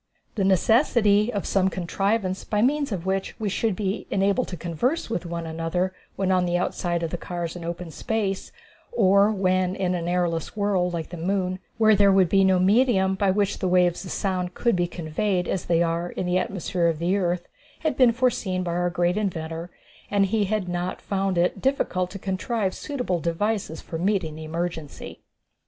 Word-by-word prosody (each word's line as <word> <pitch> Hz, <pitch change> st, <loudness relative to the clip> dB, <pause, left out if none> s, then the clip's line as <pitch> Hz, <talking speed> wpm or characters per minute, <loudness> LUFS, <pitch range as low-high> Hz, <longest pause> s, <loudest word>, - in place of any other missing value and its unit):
The 205 Hz, -, -1 dB
necessity 210 Hz, -, +3 dB
of 200 Hz, -4 st, -3 dB
some 190 Hz, -1 st, +2 dB
contrivance 190 Hz, +2 st, -1 dB
by 210 Hz, 0 st, 0 dB
means 285 Hz, +1 st, +1 dB
of 185 Hz, -3 st, -3 dB
which 190 Hz, 0 st, -2 dB
we 215 Hz, -2 st, -1 dB
should 210 Hz, +1 st, 0 dB
be 200 Hz, +1 st, -3 dB
enabled 200 Hz, +5 st, +1 dB
to 180 Hz, -, -6 dB
converse 225 Hz, -, -1 dB
with 175 Hz, -6 st, -2 dB
one 170 Hz, 0 st, -4 dB
another 165 Hz, +3 st, -2 dB, 0.2 s
when 190 Hz, -1 st, 0 dB
on 185 Hz, -1 st, +3 dB
the 175 Hz, 0 st, +1 dB
outside 175 Hz, -1 st, -1 dB
of 165 Hz, -, -2 dB
the 175 Hz, -, -3 dB
cars 175 Hz, -1 st, -4 dB
in 175 Hz, -, -7 dB
open 170 Hz, 0 st, -5 dB
space, 200 Hz, +2 st, -2 dB, 0.4 s
or 200 Hz, -, +4 dB
when 185 Hz, -2 st, +1 dB
in 185 Hz, -2 st, 0 dB
an 170 Hz, -1 st, -2 dB
airless 175 Hz, +1 st, -1 dB
world, 195 Hz, -3 st, +1 dB
like 165 Hz, -2 st, -4 dB
the 175 Hz, -, -7 dB
moon, 185 Hz, +1 st, -1 dB, 0.2 s
where 220 Hz, -1 st, +5 dB
there 200 Hz, 0 st, +5 dB
would 190 Hz, -3 st, +4 dB
be 195 Hz, +1 st, +4 dB
no 190 Hz, -1 st, +4 dB
medium 190 Hz, 0 st, +3 dB
by 195 Hz, +1 st, +1 dB
which 200 Hz, +1 st, +1 dB
the 190 Hz, -, 0 dB
waves 180 Hz, -1 st, +2 dB
of 185 Hz, -, -8 dB
sound 185 Hz, -2 st, -2 dB
could 235 Hz, -3 st, +2 dB
be 175 Hz, -1 st, +1 dB
conveyed 180 Hz, +3 st, -1 dB
as 190 Hz, -, -2 dB
they 170 Hz, 0 st, +3 dB
are 170 Hz, +1 st, -1 dB
in 185 Hz, -, -4 dB
the 180 Hz, +1 st, +2 dB
atmosphere 180 Hz, -2 st, -1 dB
of 165 Hz, -2 st, 0 dB
the 175 Hz, +4 st, +1 dB
earth, 175 Hz, -3 st, -1 dB, 0.3 s
had 315 Hz, -2 st, 0 dB
been 255 Hz, -3 st, +5 dB
foreseen 225 Hz, -7 st, 0 dB
by 170 Hz, -1 st, -2 dB
our 175 Hz, +1 st, +1 dB
great 175 Hz, +2 st, 0 dB
inventor, 165 Hz, -4 st, -3 dB, 0.4 s
and 200 Hz, -1 st, +3 dB
he 210 Hz, +1 st, +1 dB
had 205 Hz, -1 st, -1 dB
not 175 Hz, +1 st, -3 dB
found 195 Hz, -2 st, -1 dB
it 175 Hz, +2 st, +1 dB
difficult 185 Hz, -9 st, 0 dB
to 195 Hz, -, -7 dB
contrive 195 Hz, +1 st, -2 dB
suitable 250 Hz, -, -2 dB
devices 170 Hz, +1 st, -2 dB
for 165 Hz, -, -6 dB
meeting 185 Hz, -4 st, 0 dB
the 155 Hz, +1 st, -8 dB
emergency. 165 Hz, -2 st, -5 dB
185 Hz, 195 wpm, -25 LUFS, 175-200 Hz, 0.4 s, where